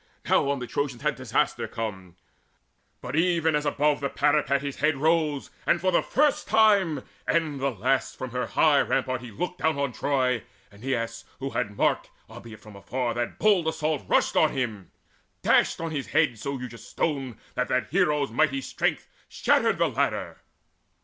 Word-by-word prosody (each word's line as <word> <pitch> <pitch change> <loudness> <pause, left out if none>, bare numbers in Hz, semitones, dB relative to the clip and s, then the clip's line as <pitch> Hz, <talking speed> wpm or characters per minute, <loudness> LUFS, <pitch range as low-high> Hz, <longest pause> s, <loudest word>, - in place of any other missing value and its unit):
Now 140 - +3
on 140 - +1
the 125 - -5
Trojans 135 0 -3
had - - +2
disaster - - -1
come, 95 -6 -6 0.9
But, 125 +3 -5
even 165 -2 +2
as 150 0 0
above 145 0 +2
the 140 - -2
parapet 145 -2 +2
His 140 -1 -4
head 150 0 +1
rose, 155 -1 +1 0.2
and 170 - +3
for 185 +2 +1
the 175 - +3
first 300 +1 +1
time 200 -10 +4 0.2
and 155 -4 0
the 140 +1 +1
last 130 +3 -1
From 130 -2 -5
her 125 0 -2
high 150 -3 +4
rampart 130 -1 -1
he 125 - -8
looked 180 - -4
down 160 -1 +1
on 140 -2 -1
Troy, 130 -2 0 0.3
Aeneas, 115 +1 -3
who 135 +1 -4
had 105 -1 -3
marked, - - +1 0.2
albeit 110 -2 -12
afar, 110 +4 -3
That 120 0 -3
bold 200 -6 +3
assault, 155 -2 -1
rushed - - +2
on 155 - +4
him, 110 - -3 0.5
dashed - - +3
on 165 -1 -3
his 145 -4 -3
head 115 -3 +1
So 140 +5 -3
huge 125 -2 -7
a 115 - -11
stone 130 0 -3 0.2
that 125 0 -1
the 125 - +2
hero's 150 - +1
mighty 135 +1 +1
strength - - -2 0.2
Shattered - - +2
the - - +3
ladder. - - -1
140 Hz, 175 wpm, -26 LUFS, 125-155 Hz, 0.9 s, time